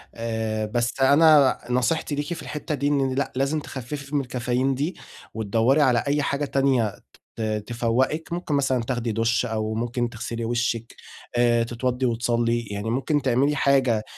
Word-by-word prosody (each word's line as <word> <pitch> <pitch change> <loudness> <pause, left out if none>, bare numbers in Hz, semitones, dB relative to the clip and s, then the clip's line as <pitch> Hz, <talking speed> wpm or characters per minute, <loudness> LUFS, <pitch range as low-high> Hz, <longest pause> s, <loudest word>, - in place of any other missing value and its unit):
آآ، 110 -1 -2
بس 120 +4 -2
أنا 145 0 +6
نصيحتي 130 +5 0
ليكِ 145 +4 -3
في 165 - -7
الحتّة 150 +1 -4
دي 145 0 -1
إن 135 -2 +1
لأ، 140 - -1
لازم 140 +4 0
تخفّفي 140 +2 -6
من 145 - +3
الكافيين 125 +1 -1
دي 150 +7 -2 0.4
وتدوّري 115 +6 +2
على 125 -4 +3
أي 145 +1 +2
حاجة 140 +1 -1
تانية، 130 -7 +1 0.4
ت 115 - -6 0.3
تفوّقِك 125 +8 0
ممكن 175 -4 -2
مثلًا 135 -3 +1
دُش 115 -2 0
أو 110 -1 -2
ممكن 120 +1 -2
تغسلي 115 0 -5
وشِّك 120 -1 -2 0.4
آآ، 120 -1 +3
تتوضّي 125 +2 -2
وتصلّي، 120 0 +1
يعني 100 +2 -3
ممكن 135 +5 0
تعملي 135 +3 +2
حاجة 130 -6 +2
125 Hz, 150 wpm, -24 LUFS, 115-140 Hz, 0.4 s, أنا